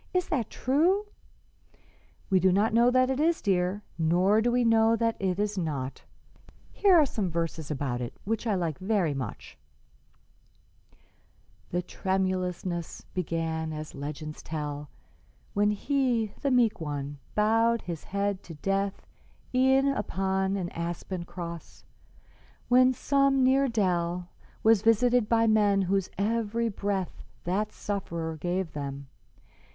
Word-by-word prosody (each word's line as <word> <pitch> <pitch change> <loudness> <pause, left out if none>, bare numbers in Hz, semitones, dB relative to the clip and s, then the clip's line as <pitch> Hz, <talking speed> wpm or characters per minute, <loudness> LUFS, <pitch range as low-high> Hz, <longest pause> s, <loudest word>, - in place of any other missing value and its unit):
"Is 365 -1 +1
that 250 -9 -1
true?" 340 +11 +2 1.3
"We 190 - +5
do 185 +1 +4
not 205 +4 +2
know 235 +2 +5
that 255 +1 +3
it 265 - -1
is, 330 +2 +2
dear, 190 +1 0 0.2
nor 180 +6 +3
do 240 +2 +2
we 245 0 +2
know 225 0 +4
that 230 0 0
it 185 -2 0
is 205 -1 -1
not. 140 -6 -3 0.7
Here 395 -3 +4
are 315 -3 +6
some 210 -8 -2
verses 165 -2 -3
about 130 -4 -2
it 120 - -5
which 225 +3 -2
I 210 - +2
like 170 -5 -2
very 190 -5 +1
much: 130 -6 -7 2.1
"'The 180 +1 -1
tremulousness 185 -2 -2
began, 160 -2 -2
as 155 0 -6
legends 150 +2 -6
tell, 150 -2 -5 0.6
When 205 +1 +3
he, 235 -1 0
the 280 - +1
meek 240 -7 +3
One, 145 -2 -4 0.2
bowed 225 +2 +3
his 170 -3 -6
head 200 0 -1
to 165 - -10
death 195 +5 -2 0.5
E'en 265 +1 +4
on 190 -3 -1
an 180 -3 -3
aspen 170 +1 -4
cross, 170 -2 -8 0.8
when 255 +1 +6
some 275 0 +2
near 270 +2 +4
dell 180 -5 0 0.3
Was 220 -2 +5
visited 230 +1 +3
by 230 -1 +4
men 205 -3 +3
whose 190 0 0
every 230 +2 0
breath 200 -2 -3 0.2
That 195 +5 -1
Sufferer 170 -5 -4
gave 175 +2 -2
them. 140 -1 -5
195 Hz, 135 wpm, -28 LUFS, 170-230 Hz, 2.1 s, are